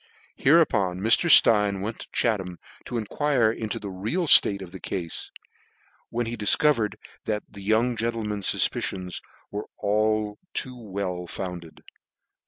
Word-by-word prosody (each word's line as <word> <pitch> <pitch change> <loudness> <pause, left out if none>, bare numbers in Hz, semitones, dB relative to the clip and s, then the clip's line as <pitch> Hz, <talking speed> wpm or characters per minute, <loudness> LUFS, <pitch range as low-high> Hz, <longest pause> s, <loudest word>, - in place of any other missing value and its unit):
Hereupon 110 - +2
Mr. 115 - +3
Stein 105 -8 +5
went 110 +3 -5
to - - -9
Chatham, 95 -7 -1 0.3
to 120 - -4
enquire 120 +1 0
into 110 -1 -5
the 100 - -7
real 110 - -3
Dilate 100 -9 +7
of 90 - -12
the 95 - -10
cafe; 85 -3 -5 1.0
when 120 +1 -3
he 115 +1 -4
difcovered 110 +2 +2 0.3
that 105 -1 -2
"the 100 - -13
young 110 +4 +1
gentleman's 110 -3 -3
fufpicions 90 -2 -1 0.3
were 105 +1 -6
but 105 0 0 0.2
too 130 -2 -2
well 95 -3 -5
founded. 85 -3 -8
105 Hz, 135 wpm, -24 LUFS, 95-115 Hz, 1.0 s, Dilate